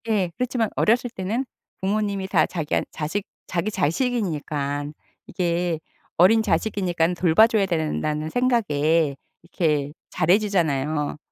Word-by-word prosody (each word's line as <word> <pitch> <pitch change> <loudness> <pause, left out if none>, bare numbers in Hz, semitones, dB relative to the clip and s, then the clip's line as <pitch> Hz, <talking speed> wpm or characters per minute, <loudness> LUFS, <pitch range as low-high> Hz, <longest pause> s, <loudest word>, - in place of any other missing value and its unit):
예. 200 -6 +1
그렇지만 245 -3 0
어렸을 245 +3 +2
때는 225 +6 -2 0.4
부모님이 200 0 -1
다 180 -4 +3
자기안 160 -4 -1
자식 165 +7 -3 0.2
자기 180 +4 -1
자식이니깐 155 - -1 0.3
이게 175 -2 -1 0.4
어린 205 +6 +6
자식이니깐 180 -3 0
돌봐 175 +5 +5
줘야 220 -4 +2
된다는 155 -3 -1
생각에 165 - +1 0.3
이렇게 150 -4 -1 0.2
잘해 180 +6 +3
주잖아요. 155 -8 0
175 Hz, 290 characters per minute, -23 LUFS, 155-210 Hz, 0.4 s, 어린